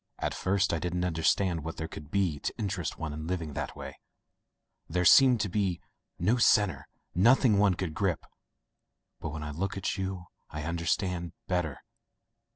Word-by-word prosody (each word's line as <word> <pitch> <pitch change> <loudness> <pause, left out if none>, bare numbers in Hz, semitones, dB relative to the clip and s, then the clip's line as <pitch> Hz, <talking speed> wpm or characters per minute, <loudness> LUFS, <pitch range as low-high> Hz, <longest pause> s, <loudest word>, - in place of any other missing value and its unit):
"At - - -2
first 95 0 +1
I 85 - 0
didn't 90 +1 -1
understand 85 0 +1
what 80 +1 -6
there 80 - -3
could 75 -2 -10
be 90 -6 0
to - - -2
interest 95 -5 -3
one 80 -2 -4
in 80 +1 -6
living 85 -4 -3
that - - -4
way - - -8 0.5
— - - -50
there 90 +2 0
seemed 130 +1 +7
to - - 0
be 95 -2 -1 0.4
no 105 +8 +2
centre, 105 - +3 0.3
nothing 110 +2 +5
one 100 -3 +4
could 90 -3 -3
grip. 95 -2 -1 0.9
But 80 - -4
when 75 +1 -6
I 75 - -4
look 95 +6 -3
at 95 - -2
you 95 -2 -3 0.2
I 75 0 -5
understand 85 +1 -1
better. 85 -7 -2
90 Hz, 170 wpm, -29 LUFS, 80-95 Hz, 0.9 s, seemed